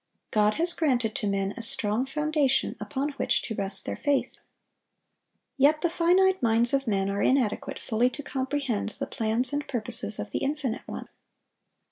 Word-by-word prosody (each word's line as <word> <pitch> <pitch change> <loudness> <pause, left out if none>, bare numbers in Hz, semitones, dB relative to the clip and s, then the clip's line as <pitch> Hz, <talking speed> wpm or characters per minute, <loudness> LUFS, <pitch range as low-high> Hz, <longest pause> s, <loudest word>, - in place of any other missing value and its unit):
God 210 0 +3
has 340 +3 +2
granted 250 -8 +1
to 210 - -2
men 195 0 -1
a 235 - -6
strong 225 +2 0
foundation 300 -1 +1
upon 280 +1 -2
which - - +1
to 225 - -4
rest 195 -2 -1
their - - -4
faith. 285 -2 0 1.2
Yet 295 +3 +4
the 345 - +1
finite 365 +3 +3
minds 235 +1 +4
of 275 -1 +1
men 195 -2 +1
are 200 0 -1
inadequate 255 -6 +1
fully 235 +3 +1
to 290 +3 -7
comprehend 265 -5 -2
the - - -2
plans 230 +5 +1
and 290 0 -2
purposes 225 -3 -3
of - - -6
the - - -1
Infinite 275 -4 -3
One. - - -6
255 Hz, 165 wpm, -27 LUFS, 220-290 Hz, 1.2 s, Yet